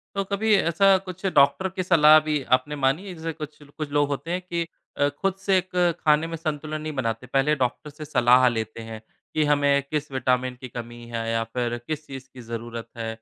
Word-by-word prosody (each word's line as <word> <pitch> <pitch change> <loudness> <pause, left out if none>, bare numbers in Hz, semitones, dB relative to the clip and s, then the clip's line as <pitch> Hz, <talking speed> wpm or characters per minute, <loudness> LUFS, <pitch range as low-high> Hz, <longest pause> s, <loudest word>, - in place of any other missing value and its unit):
तो 195 - +1
कभी 210 +2 +1
ऐसा 195 +2 +4
कुछ 185 0 -10
डॉक्टर 140 +7 +4
की 185 - -1
सलाह 155 -4 +7
भी 155 -2 -1
आपने 130 +4 0
मानी 140 +8 0
है? 185 - -6
जैसे 165 0 -4
कुछ 155 -1 -8
कुछ 145 +1 -7
लोग 145 0 +2
होते 145 +4 -4
हैं 180 - -1
कि 170 -2 -3 0.3
अ, 145 - +3
खुद 185 +7 -2
से 195 0 +2
एक 185 0 -4 0.4
खाने 155 +1 +4
में 165 0 -5
संतुलन 155 -1 -4
नहीं 155 0 -4
बनाते, 115 -3 -3
पहले 135 +4 +2
डॉक्टर 130 +3 -2
से 150 +2 -9
सलाह 125 -3 +4
लेते 110 -1 -3
हैं 110 -1 -8 0.3
कि 155 - +2
हमें 145 -1 +3
किस 150 -1 -2
विटामिन 130 -1 0
की 130 - -7
कमी 120 0 -8
है 115 -1 -3
या 115 0 +1
फिर 120 -1 -1
किस 155 -1 -4
चीज़ 135 -1 -9
की 130 - -10
ज़रूरत 115 0 -6
है 115 -1 -4
145 Hz, 215 wpm, -24 LUFS, 125-165 Hz, 0.4 s, सलाह